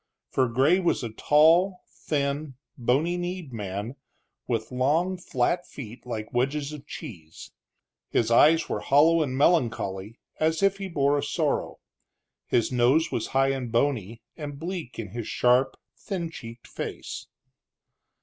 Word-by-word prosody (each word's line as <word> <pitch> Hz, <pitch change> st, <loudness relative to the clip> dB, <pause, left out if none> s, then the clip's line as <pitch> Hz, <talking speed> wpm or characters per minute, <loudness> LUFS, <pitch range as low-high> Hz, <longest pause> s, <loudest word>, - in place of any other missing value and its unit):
For 130 Hz, -1 st, +2 dB
Gray 135 Hz, +10 st, +3 dB
was 175 Hz, -7 st, +1 dB
a 115 Hz, -, -4 dB
tall, 165 Hz, -, +4 dB
thin, 140 Hz, -1 st, -3 dB, 0.2 s
bony 140 Hz, +9 st, +1 dB
kneed 175 Hz, -5 st, -5 dB
man, 105 Hz, +4 st, -5 dB, 0.5 s
with 115 Hz, -2 st, -2 dB
long 150 Hz, +9 st, +1 dB
flat 175 Hz, 0 st, -1 dB
feet 125 Hz, -2 st, -10 dB
like 110 Hz, -3 st, -5 dB
wedges 140 Hz, +4 st, 0 dB
of 145 Hz, -1 st, -10 dB
cheese. 80 Hz, -, -9 dB, 0.6 s
His 115 Hz, 0 st, +1 dB
eyes 160 Hz, +7 st, +5 dB
were -, -, -2 dB
hollow 160 Hz, +4 st, +4 dB
and 130 Hz, -4 st, -1 dB
melancholy, 115 Hz, -, +1 dB, 0.2 s
as 160 Hz, +3 st, +1 dB
if 195 Hz, 0 st, +3 dB
he 195 Hz, -, -4 dB
bore 145 Hz, -3 st, +2 dB
a -, -, -3 dB
sorrow; -, -, -1 dB, 0.7 s
his 120 Hz, +1 st, +1 dB
nose 130 Hz, +7 st, +3 dB
was 110 Hz, -, -2 dB
high 135 Hz, 0 st, +4 dB
and 130 Hz, -4 st, -4 dB
bony, 115 Hz, -3 st, 0 dB
and 145 Hz, -3 st, -6 dB
bleak 170 Hz, -4 st, -5 dB
in 110 Hz, -3 st, -5 dB
his 115 Hz, +2 st, -6 dB
sharp, 125 Hz, +2 st, +2 dB, 0.2 s
thin 175 Hz, -5 st, -4 dB
cheeked 115 Hz, -6 st, -10 dB
face. -, -, -6 dB
135 Hz, 140 wpm, -26 LUFS, 120-160 Hz, 0.7 s, eyes